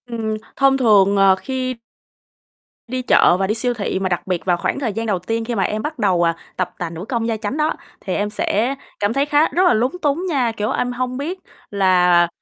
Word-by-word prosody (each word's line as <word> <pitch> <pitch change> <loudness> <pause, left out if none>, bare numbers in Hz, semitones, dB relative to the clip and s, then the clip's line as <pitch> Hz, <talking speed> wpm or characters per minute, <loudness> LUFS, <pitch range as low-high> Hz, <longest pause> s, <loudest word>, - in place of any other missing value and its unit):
Ừm, 225 -3 -3 0.2
thông 275 0 +3
thường, 205 -5 +4
ờ, 195 -1 +5
khi 255 +4 -3 1.1
đi 255 +2 -3
chợ 180 -7 +4
và 190 0 0
đi 210 - +1
siêu 245 +2 0
thị 200 -4 -2
mà 190 -1 -1
đặc 175 -2 -2
biệt 180 -2 -2
vào 175 -2 +2
khoảng 175 - -2
thời 235 -7 -2
gian 225 +2 -3
đầu 200 -5 0
tiên 225 +5 -3
khi 240 0 -3
mà 195 - +1
em 215 +3 -2
bắt 300 +2 -5
đầu, 185 -5 +2
à, 165 - 0 0.2
tập 180 -1 -1
tành 170 -2 -4
nữ 170 +3 -7
công 230 -3 -1
gia 225 -1 -1
chánh 215 +6 -4
đó, 305 +1 +1 0.3
thì 190 - -4
em 205 0 -1
sẽ 220 +4 0 0.2
cảm 205 +2 0
thấy 275 +2 +1
khá 295 +1 +3
rất 365 - +1
là - - +5
lúng 240 +4 +1
túng 300 +4 0
nha. 260 -7 +1
Kiểu, 210 +1 -1
em 245 - -1
hông 255 +1 -3
biết 335 +7 -4 0.3
là 180 -3 +4
225 Hz, 235 wpm, -20 LUFS, 190-255 Hz, 1.1 s, ờ